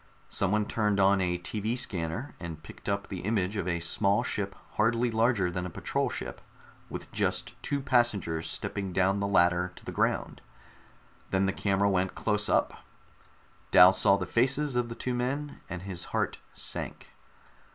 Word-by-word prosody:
Someone 105 +2 +1
turned 105 -2 0
on 95 0 +4
a 90 -1 0
TV 110 +6 -2
scanner 100 - -3
and 80 -2 -7
picked - - -8
up 100 0 -1
the 95 - -5
image 100 -1 -1
of 95 -4 -2
a 85 -1 0
small 100 +4 +2
ship 100 -1 -2 0.2
hardly 115 +2 +2
larger 110 -5 +2
than 90 0 -3
a 90 - -4
patrol - - -1
ship, - - -6 0.5
with - - -7
just - - -2
two 140 - -1
passengers 115 - +1
stepping 95 -2 -3
down 95 +2 +2
the 100 - 0
ladder 90 -1 +3
to - - -15
the - - -5
ground. - - -1 0.9
Then 95 0 +2
the 95 - 0
camera 100 0 +1
went 95 -1 +1
close 105 -1 0
up. - - +2 0.9
Dal 90 +1 +8
saw 100 0 +4
the 95 - -3
faces 135 +5 +2
of 120 -1 0
the 115 - -6
two 125 - -3
men, 140 +4 -3
and 90 0 -5
his 90 -3 -5
heart - - -2
sank. - - -3
100 Hz, 170 wpm, -29 LUFS, 90-115 Hz, 0.9 s, Dal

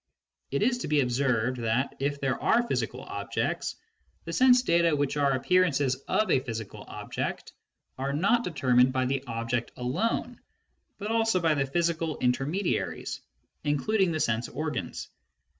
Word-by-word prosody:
It 140 - 0
is 245 +2 +2
to - - -4
be 150 -1 +3
observed 125 -1 +1
that, 115 +4 0
if 140 +1 -1
there 135 -2 -1
are 240 +1 +3
physical - - -2
objects, - - -3 0.5
the - - -5
sense 255 -1 +5
data 170 -7 +3
which 145 -1 0
are 140 -2 +2
appearances 145 -2 +2
of 215 - +1
a - - +5
physical 115 -5 -6
object - - -5 0.5
are 135 +1 -1
not 200 - +2
determined 130 - +3
by 130 -1 +1
the 135 +1 -1
ob 115 0 -4
ject 120 -2 -1
alone 225 - -1 0.6
but 210 +2 -4
also 225 -4 +2
by 165 -2 +3
the 140 -2 0
physical 165 +1 0
intermediaries, 135 +10 -1 0.4
including 170 +7 +1
the 155 - -1
sense 120 -3 0
organs. 155 -4 -4
145 Hz, 150 wpm, -28 LUFS, 130-180 Hz, 0.6 s, sense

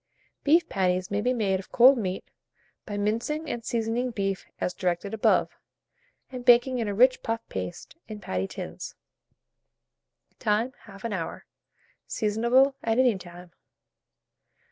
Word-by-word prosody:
Beef 325 +4 +4
patties 185 -1 0
may 205 +1 0
be 250 +3 +1
made 200 -6 +1
of 190 - -11
cold 255 +3 +7
meat, 190 -6 -3 0.6
by 205 - -4
mincing 230 +10 -1
and 235 - -4
seasoning 230 +2 -1
beef 195 -4 -3
as 180 - -1
directed 180 +2 -2
above, 220 - +2 0.8
and 250 -1 -6
baking 245 +1 +5
in 225 - -1
a 205 - -1
rich 255 +4 +5
puff 225 -1 -3
paste 90 -1 -6
in 215 -1 -7
patty 95 - -2
tins. - - -7 1.4
Time, 220 +5 +1
1/2 205 +2 -6
hour. 170 -4 -5 0.6
Seasonable 235 +6 +2
at 225 0 +1
any 250 -4 +4
time. 175 -1 -11
220 Hz, 135 wpm, -27 LUFS, 195-245 Hz, 1.4 s, cold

